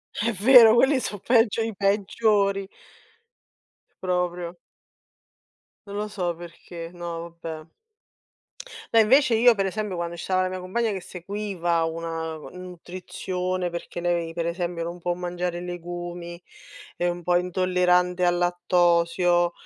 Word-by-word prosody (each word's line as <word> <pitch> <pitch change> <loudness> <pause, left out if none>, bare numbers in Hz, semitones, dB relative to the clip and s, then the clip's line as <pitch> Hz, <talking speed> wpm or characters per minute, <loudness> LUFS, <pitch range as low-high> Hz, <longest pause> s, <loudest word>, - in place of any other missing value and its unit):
È 230 +3 0
vero 225 +2 +8
quelli 265 +3 +4
sono 205 - -4
peggio 230 -2 +3
i 225 -1 -3
peggiori. 200 0 +1 1.4
Proprio. 180 -1 -2 1.3
Non 200 - -7
lo 210 +1 -2
so 180 -5 -2
perché, 170 0 -9
no, 170 -1 -6
vabbè. 160 -1 -6 1.3
No, 230 - +7
invece 250 +2 +4
io 240 +1 +6
per 195 -2 -1
esempio 200 -1 -3
quando 170 0 -3
ci 170 - -7
stava 185 -1 +1
la - - 0
mia 185 - -5
compagna, 220 +5 -1
che 195 -2 -4
seguiva 180 -2 -2
una, 165 0 -3
ehm, 155 - -10
nutrizione, 180 0 -4
perché 170 0 -6
lei 170 -1 -1
per 170 0 -2
esempio 170 -1 -3
non 175 +1 -6
può 175 +1 0
mangiare 175 0 -3
legumi, 175 0 -6 0.5
è 175 - -2
un 175 0 -4
po' 175 +1 +1
intollerante 180 0 +2
al 175 0 +3
lattosio, 175 0 +2
180 Hz, 135 wpm, -25 LUFS, 175-195 Hz, 1.4 s, vero